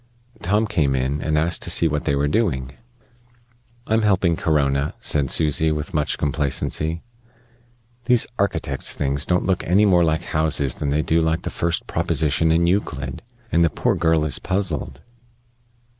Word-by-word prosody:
Tom 105 +5 +1
came 75 -10 0
in, 65 +3 -1
and 75 0 0
asked 85 +2 0
to - - -2
see 85 - +2
what 75 -1 -2
they 70 - +1
were 70 +1 +1
doing. 70 - -1 1.1
"I'm 110 +1 +1
helping 95 -5 +2
Corona," 70 -3 0
said 70 -3 0
Susy, 80 +2 +2
with 75 0 -4
much 75 -1 0
complacency. 75 +2 -1 1.0
"These 125 -1 +3
architects' 70 -8 -1
things 70 0 0
don't 90 0 +1
look 95 -1 0
any 95 +5 +3
more 90 -4 +4
like 80 0 0
houses 75 -5 0
than 75 - -1
they 75 +2 +1
do 80 +1 +2
like 80 0 0
the - - -4
first 85 0 -2
proposition 80 +1 0
in 85 +1 +3
Euclid; 75 -8 -2 0.3
and 85 +1 +3
the 85 - +3
poor - - 0
girl 80 -2 +1
is 75 - -1
puzzled." 85 -8 -3
80 Hz, 160 wpm, -21 LUFS, 70-85 Hz, 1.1 s, more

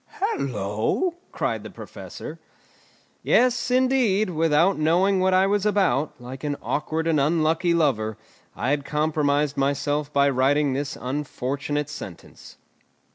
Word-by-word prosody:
"Hallo!" 130 - -1 0.2
cried - - -2
the - - -9
Professor. - - -9 0.8
Yes, 250 +1 +2
indeed, 250 -6 +2
without 165 +2 +2
knowing 180 +5 +3
what 185 0 +2
I 190 +1 +5
was 200 0 +1
about, 185 -11 +1
like 130 +3 -9
an 145 -1 -1
awkward 155 +2 -2
and 160 -2 +2
unlucky 160 +3 +2
lover, 110 -10 +1 0.4
I 130 - -1
had 145 -1 0
compromised 150 -1 0
myself 145 +1 0
by 140 -1 +3
writing 140 +1 +2
this 140 +1 -3
unfortunate 140 +1 -3
sentence. 120 - -10
150 Hz, 125 wpm, -24 LUFS, 140-185 Hz, 0.8 s, I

